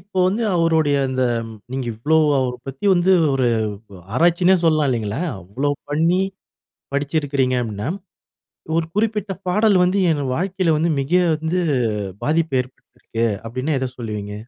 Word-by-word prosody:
இப்போ 190 +1 -7
வந்து 205 +5 0
அவருடைய, 160 -4 +2
அந்த 130 0 -1 0.5
நீங்க 130 -2 -3
இவ்வளோ 145 +9 +1 0.2
அவரைப் 125 -1 -3
பத்தி 135 +9 -4
வந்து, 180 +2 +3 0.2
ஒரு 130 -2 +1 0.5
ஒ - - -10 0.2
ஆராய்ச்சின்னே 175 +5 +4
சொல்லலாம், 155 -3 +3
இல்லைங்களா? 110 0 -2 0.2
அவ்ளோ 125 +11 -2 0.2
பண்ணி 165 +5 +2 0.7
படிச்சிருக்கிறீங்க 140 -3 0
அப்டீன்னா, 110 +2 -4 0.9
ஒரு 165 - +1
குறிப்பிட்ட 210 -1 0 0.2
பாடல் 210 +1 +3
வந்து, 185 +2 +2
என் 145 -2 -1
வாழ்க்கைல 185 -2 0
வந்து, 165 +2 +1
மிக 135 +5 -6 0.2
வந்து 160 +3 -1 0.6
பாதிப்பு 160 -2 +1
ஏற்படுத்திருக்கு 125 -2 -6 0.2
அப்பிடீன்னா, 130 +6 -2
எத 130 - -2
சொல்வீங்க? 105 -4 -5
150 Hz, 135 wpm, -21 LUFS, 130-175 Hz, 0.9 s, ஆராய்ச்சின்னே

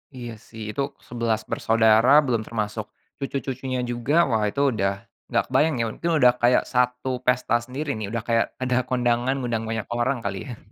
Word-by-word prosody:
Iya 120 -2 -6
sih 110 -1 -11
itu 140 - -1 0.3
11 115 -2 -1
bersaudara 115 +4 +4
belum 120 -4 0
termasuk, 110 -1 -3 0.3
cucu-cucunya 135 -1 -3
juga 120 +3 -2 0.2
wah 110 -3 +1
itu 140 - -2
udah, 100 -2 -1 0.2
nggak - - +2
kebayang 155 0 +2
ya 115 - 0
mungkin 170 - -2
udah 125 -4 +6
kayak 120 +1 +4
satu 125 0 0
pesta 125 -1 +2
sendiri 140 +4 -4
nih 110 -3 -4
udah 115 0 -3
kayak 115 -1 +3
ada 130 0 +1
kondangan 125 +1 +1
ngundang 120 -4 -2
banyak 110 -2 -2
orang 120 +3 0
kali 100 +3 -4
ya. 120 - -7
120 Hz, 175 wpm, -24 LUFS, 115-130 Hz, 0.3 s, udah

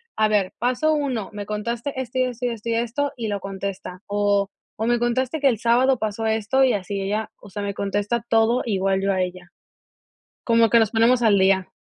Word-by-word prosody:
a 215 - +3
ver, 200 -3 +1
paso 255 +6 +1
1 265 -9 -2
me 205 -1 -6
contaste 235 +6 -3
esto 255 0 -4
y - - +4
esto, 250 -1 -3
y - - +1
esto, 230 -1 -5
y - - +1
esto, 240 +5 -1
y 230 -2 -3
lo 205 -1 -2
contesta. 195 -1 -6
O, 205 -1 +1 0.3
o 220 - -1
me 240 0 +2
contaste 255 +5 0
que 280 - +3
el 235 -6 +2
sábado 250 +3 +3
pasó 220 +1 -3
esto. 220 +4 +2
Y 260 - +4
así 200 0 -3
ella, 210 +3 -2
o 205 - -14
sea, 205 - -5
me 200 0 -3
contesta 205 +4 -1
todo, 225 +2 +3
igual 195 -3 +1
yo 195 0 +1
a 190 - 0
ella. 180 -1 -5 0.9
Como 230 -1 +4
que 235 - +6
nos 220 -2 +3
ponemos 235 +2 +4
al 210 -3 +4
día. 190 -1 +2
220 Hz, 220 wpm, -23 LUFS, 200-240 Hz, 0.9 s, que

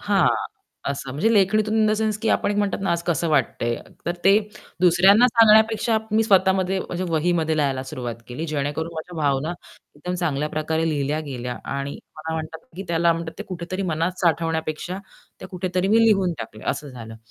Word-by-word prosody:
हां. - - +3 0.6
असं 135 -1 -5
म्हणजे 210 - +1
लेखणीतून 215 +1 +3
इन 220 -1 +4
द 215 - +3
सेन्स 215 -1 0
की 225 - +1
आपण - - +1
एक 205 - -1
म्हणतात 205 -1 0
ना, 190 - 0
आज 170 0 0
कसं 170 -1 0
वाटतंय. 120 -5 +1 0.3
तर 175 - 0
ते 195 +2 +7 0.4
दुसऱ्यांना 185 +6 +6
सांगण्यापेक्षा 220 0 +5
मी 220 +1 +3
स्वतःमध्ये 190 -2 +3
म्हणजे 180 0 -4
वहीमध्ये 160 -1 +1
लिहायला 135 -3 0
सुरुवात 125 -3 -5
केली, 125 +7 -5
जेणेकरून 150 +2 -2
माझ्या 165 +2 -7
भावना 145 +1 0 0.4
एकदम 180 +5 -4
चांगल्या 150 -5 -1
प्रकारे 160 +1 -1
लिहिल्या 150 0 -1
गेल्या 125 -4 -5 0.2
आणि 140 0 -4 0.2
मला 160 +1 -4
म्हणतात 160 0 -6
की 190 - -4
त्याला 170 0 +3
म्हणतात 165 0 -5
ते 210 - -3
कुठेतरी 185 +1 -4
मनात 170 +1 -1
साठवण्यापेक्षा 165 +1 -1 0.4
त्या - - -8
कुठेतरी 180 0 -2
मी 225 +2 +5
लिहून 195 -5 +3
टाकल्या 110 -1 -7
असं 150 - -5
झालं. 115 -4 -9
170 Hz, 175 wpm, -23 LUFS, 150-190 Hz, 0.6 s, ते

